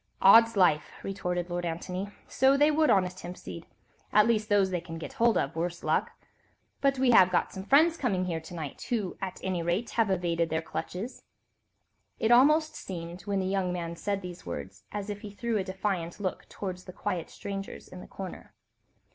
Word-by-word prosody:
"Odd's 230 +3 +7
life!" 175 -5 +4
retorted 180 -3 -2
Lord 175 0 -2
Antony; 180 +3 -3 0.2
"so 265 +1 +4
they 295 +2 +5
would, 310 0 +3
honest 185 -2 +2
Hempseed,—at 180 +4 -2
least 220 -2 +1
those 200 -2 +3
they 175 -2 -1
can 165 -1 -8
get 160 - -7
hold 235 -1 +3
of, 135 - -1
worse 170 +1 -3
luck! - - +1 0.7
But 275 -1 +3
we 255 -1 +4
have 185 -5 +7
got 180 - 0
some 190 0 -6
friends 315 +7 +5
coming 195 - 0
here 170 -3 -2
to 160 +2 -10
night, 155 -4 -6
who 215 -7 -1
at 190 -1 -4
any 185 -2 -1
rate 175 +7 -1
have 225 -3 +2
evaded 170 -3 0
their 160 +1 -1
clutches." 195 +8 -5 1.0
It 225 - +1
almost 305 +6 +5
seemed, 175 -1 -7
when 200 -1 +1
the - - -2
young 190 -1 0
man 170 -1 -4
said 200 +2 -2
these 180 -1 -8
words, 95 +1 -7
as 205 0 -4
if 205 0 -7
he 210 - -7
threw 220 +2 -2
a - - 0
defiant 190 -2 -3
look 190 -3 -4
towards 185 -2 -6
the 185 - -9
quiet 175 -2 -3
strangers 195 -1 -6
in 185 - -10
the - - -11
corner. 190 -2 -8
190 Hz, 190 wpm, -29 LUFS, 175-215 Hz, 1.0 s, Odd's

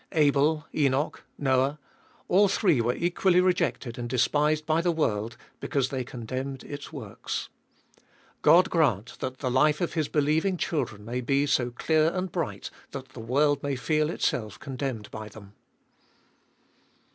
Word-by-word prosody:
Abel, 150 0 +3
Enoch, 140 0 +1 0.2
Noah 135 +1 +1 0.3
— - - -32
all 200 +3 +5
three 180 - +2
were 120 +2 0
equally 180 +1 +2
rejected 160 -10 0
and 120 0 -4
despised 150 +4 +2
by 160 +1 +2
the 175 0 +2
world, 115 -8 -1 0.2
because 135 -2 0
they 130 -2 -2
con 120 -1 -8
demned 130 +2 -4
its 145 -1 -8
works. 125 -10 -5 0.9
God 180 +3 +6
grant 120 - +1
that 130 0 -4
the 130 -2 -2
life 150 +4 +3
of 175 - -1
his 155 -3 0
believing 155 +5 +1
children 120 -12 -2
may 120 +3 -3
be 135 +4 +2
so 125 -4 +1
clear 155 +6 +2
and 185 -1 -2
bright, 170 -4 -3 0.2
that 135 -1 -8
the 130 - -11
world 140 +5 +2
may 140 -1 -1
feel 155 +3 +1
itself 110 - -2
condemned 130 -6 -5
by 110 -1 -7
them 100 -1 -13
140 Hz, 155 wpm, -27 LUFS, 125-155 Hz, 0.9 s, God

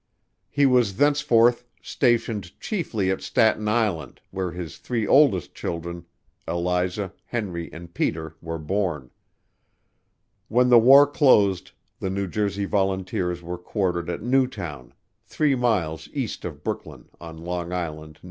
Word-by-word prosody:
He 145 -1 +2
was 125 -7 +3
thenceforth 125 -5 +3 0.2
stationed 115 -7 -1
chiefly 115 - -1
at 95 - -2
Staten 110 -1 +2
Island, 105 - -1
where 95 -1 -2
his 85 -2 -7
three 115 -3 -2
oldest 110 - +4
children 85 0 -5 0.4
Eliza, 90 +2 -1
Henry 95 -7 -4
and 85 +1 -11
Peter 80 -1 -2
were 80 0 -4
born. 80 -5 -2 1.4
When 125 +3 +3
the 120 -1 +8
war 135 +5 +8
closed 105 - +3 0.3
the 95 - -2
New 100 +1 -2
Jersey 100 +1 -2
Volunteers 95 -3 -1
were 90 +1 -5
quartered 90 -3 -2
at 85 - -4
Newtown, 100 - -1 0.3
three 150 -2 +1
miles 105 - 0
east - - -4
of - - -7
Brooklyn, - - -6
on 80 -1 -9
Long 85 +1 -4
Island, 80 -3 -5
N. - - -30
95 Hz, 130 wpm, -24 LUFS, 85-115 Hz, 1.4 s, the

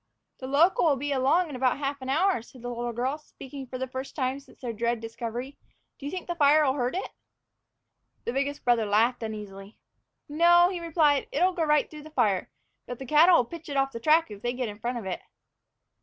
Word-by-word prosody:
"The 260 - -6
local'll 310 +2 +4
be 285 +2 -3
along 280 +6 +2
in - - -6
about 255 0 +1
half 280 0 -3
an 260 - -6
hour," 345 - +2
said 245 +1 -16
the 245 - -4
little 240 0 -3
girl, 255 +6 -2
speaking 270 -2 -10
for 255 - -6
the 260 - -2
first 260 +1 -7
time 265 -1 -1
since 275 -1 -20
their 240 -3 -4
dread 235 +1 -1
discovery. 230 +4 -6 0.4
"Do 280 - -6
you - - -4
think 370 -1 -5
the 345 - -3
fire'll 295 -3 +4
hurt 250 +1 -1
it?" 380 - -4 1.1
The 235 - -2
biggest 280 +2 -2
brother 235 -3 +3
laughed 230 +5 +2
uneasily. 210 -2 -7 0.5
"No," 345 +4 +5
he 360 - -4
replied, 310 -4 +2
"it'll 360 +6 +2
go 335 -2 0
right 300 -1 +3
through 305 -1 -11
the 310 - -12
fire; 215 -10 +1 0.4
but 245 - -6
the 265 - -8
cattle'll 305 +1 +5
pitch 330 +4 -10
it 280 - -2
off 270 0 +1
the 230 - -6
track 310 +1 +3
if 205 -1 -9
they 240 +1 -1
get 250 -2 -3
in 205 0 -10
front 240 +2 -3
of 225 - -6
it." 190 - -4
270 Hz, 215 wpm, -27 LUFS, 240-305 Hz, 1.1 s, No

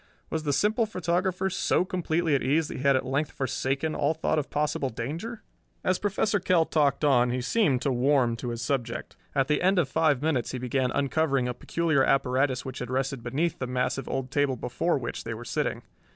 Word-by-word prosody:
Was 160 - -1
the 150 -2 -1
simple 215 - +2
photographer 185 0 0
so 185 -1 +1
completely 170 -3 0
at 140 - +2
ease 150 +3 +1
that - - -5
he - - -5
had 140 0 +4
at 130 - 0
length 140 +4 -1
forsaken 135 +3 -1
all 145 +3 +1
thought 155 0 0
of 145 - -4
possible 145 -2 -1
danger? 160 - -5 0.4
As 185 0 +1
Professor 205 0 +1
Kell 180 -2 +3
talked 150 -2 +1
on 125 -4 +4
he 125 +1 -1
seemed 135 - +1
to 140 - +1
warm 125 -1 +2
to 120 - -4
his 115 -1 -4
subject. 120 -2 -3 0.2
At 135 -2 +2
the 150 - +1
end 190 +2 +3
of 170 -6 +3
five 150 -2 +2
minutes 140 -8 0
he - - -2
began 125 +1 0
uncovering 140 -1 +1
a 125 - -2
peculiar 155 +2 +1
apparatus 130 -1 +1
which 130 -1 -6
had 125 - -5
rested 130 0 -1
beneath 140 +8 -1
the 130 - -2
massive 125 +1 -1
old 135 0 -3
table 140 -2 +1
before 145 +8 -1
which 120 -3 -5
they 115 0 -4
were 120 +2 -9
sitting. - - -2
140 Hz, 210 wpm, -27 LUFS, 130-160 Hz, 0.4 s, had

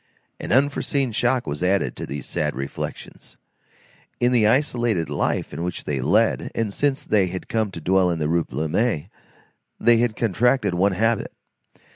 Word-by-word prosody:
An - - -5
unforeseen 135 0 +1
shock 120 +3 +1
was 75 +2 -4
added 95 +2 +1
to - - -6
these 70 -2 -6
sad - - -2
reflections. 70 +1 -7 0.8
In 120 0 +3
the 115 -4 +4
isolated 120 - +1
life - - -1
which 90 +1 -4
they 70 -3 -2
led, 105 - +2
and 110 -3 -1
since 140 +2 0
they 100 -3 +2
had 90 +1 -6
come 110 -2 0
to 95 - -8
dwell 90 +2 +2
in 85 - -1
the 75 -2 -1
Rue 85 +1 +1
Plumet, 80 +3 -1 0.7
they 120 -1 +5
had 115 -1 +1
contracted 120 +2 +1
one 95 +3 +2
habit. 115 +4 0
105 Hz, 160 wpm, -23 LUFS, 85-120 Hz, 0.8 s, they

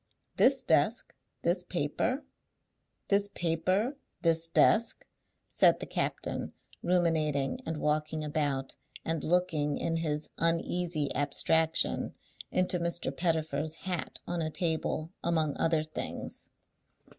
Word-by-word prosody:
This - - +5
desk, - - +2 0.3
this 175 +2 +2
paper, 180 - -1 0.8
this 200 0 +4
paper, 185 - 0 0.3
this 165 -1 +4
desk," 225 +7 +4 0.4
said - - +4
the - - -4
captain, - - -3 0.3
ruminating 160 - +1
and 160 - -2
walking 155 +1 0
about, 145 -3 -1 0.3
and 165 -2 -1
looking, 155 -4 +1
in 165 0 -1
his 150 -2 -2
uneasy 165 -2 0
abstraction, 160 +3 +2 0.3
into 185 -1 +1
Mr. 170 0 -2
Pettifer's 160 -3 -1
hat 180 -2 -3
on 175 -1 -2
a 155 - 0
table, 160 -1 -1
among 160 -3 +1
other 160 -1 +2
things. 155 0 -6
165 Hz, 110 wpm, -30 LUFS, 155-175 Hz, 0.8 s, This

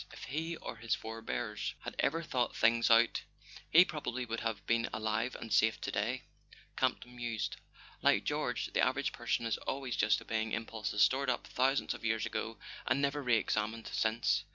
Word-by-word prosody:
"If - - -10
he 160 +5 -3
or 115 - -7
his 115 +1 0
forebears 110 -1 -4
had - - -6
ever 165 +4 +1
thought 130 -7 -1
things 115 +1 +4
out 115 0 +5 0.5
he 175 +3 +8
probably 130 -7 -3
would 115 -1 -3
have 110 -3 -3
been 115 0 +1
alive 110 +3 -1
and 115 -2 -5
safe 110 +2 +4
to - - -3
day," 120 +5 -1 0.5
Campton 125 0 -1
mused, 120 -3 -3 0.4
"like - - +4
George... - - -1
The - - +3
average - - +1
person 115 - -1
is 115 - 0
always 135 -3 -3
just 105 - +3
obeying 110 -1 -2
impulses 110 -3 0
stored 130 +5 +3
up 120 - -1
thousands, 135 +2 +1
of - - -10
years 115 0 +1
ago, 115 0 -3 0.3
and 140 - +2
never 140 +1 0
re 120 -4 +3
examined 110 +1 -1
since." 110 +1 +1
115 Hz, 175 wpm, -33 LUFS, 110-130 Hz, 0.5 s, he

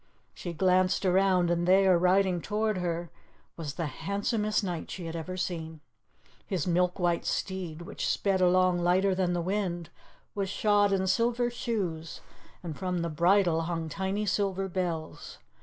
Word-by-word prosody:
She 175 - -6
glanced 185 +2 +2
around, 185 -1 +3
and 175 0 0
there, 190 0 +5
riding 180 0 +3
toward 215 0 -1
her, 170 -1 -3 0.4
was 150 -4 -6
the 170 - -2
handsomest 210 - -1
knight 175 -4 -4
she 180 - -6
had 165 0 -5
ever 185 +3 -5
seen. 160 -3 -4 0.7
His 180 -6 -1
milk 180 0 +1
white 175 -2 +1
steed, 180 -4 -3
which - - -4
sped 195 -2 +1
along 180 0 +4
lighter 185 +3 +3
than 185 -1 0
the 175 -1 -1
wind, 180 -3 -2 0.4
was 200 -2 -2
shod 205 0 +2
in 190 -1 +1
silver 240 +4 +1
shoes, 185 - -3 0.4
and 165 -3 -5
from 180 +1 -2
the 170 - -2
bridle 170 +1 +3
hung 165 -1 -3
tiny 195 +5 -2
silver 195 -1 0
bells. 175 -4 -4
185 Hz, 155 wpm, -29 LUFS, 170-195 Hz, 0.7 s, there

